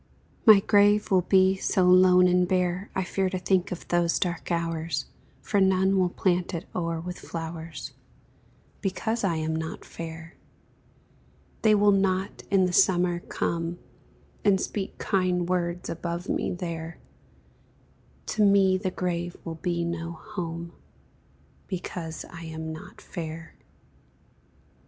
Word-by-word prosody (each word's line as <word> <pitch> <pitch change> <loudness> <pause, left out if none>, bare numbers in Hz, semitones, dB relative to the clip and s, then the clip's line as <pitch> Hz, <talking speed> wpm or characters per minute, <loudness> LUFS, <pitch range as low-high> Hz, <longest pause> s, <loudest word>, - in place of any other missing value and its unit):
My 210 -3 +9
grave 205 +1 +4
will 185 -1 +5
be 190 +1 +4
so 190 0 +1
lone 180 0 +6
and 180 0 +3
bare, 185 +1 0
I 190 - +1
fear 190 +1 -1
to 185 - -2
think 185 0 +1
of 180 - -6
those 175 -1 +2
dark 175 -1 -2
hours, 165 -3 -1 0.4
For 200 - +1
none 190 0 +3
will 185 -2 +3
plant 180 -1 0
it 170 - -5
o'er 165 -2 -2
with 180 +2 -6
flowers, 165 -1 -6 0.9
Because 220 +4 -2
I 180 -4 +1
am 160 0 -1
not 160 0 -5
fair; 165 0 -8 1.3
They 215 -1 +5
will 205 0 +5
not 195 0 0
in 195 -2 +4
the 180 - -1
summer 175 -1 +3
come 170 0 -3 0.7
And 200 -2 +4
speak 195 0 -4
kind 180 -3 0
words 175 -1 -1
above 170 +1 -4
me - - -1
there; 170 -2 -5 1.3
To 215 - +1
me 195 -2 +4
the 190 -1 -1
grave 175 -1 -3
will 165 - -4
be 170 -2 -1
no 170 0 -4
home, 170 0 -6 0.9
Because 175 -3 -5
I 165 -1 -9
am 160 0 -5
not 155 - -11
fair. 160 -2 -7
180 Hz, 135 wpm, -26 LUFS, 170-190 Hz, 1.3 s, My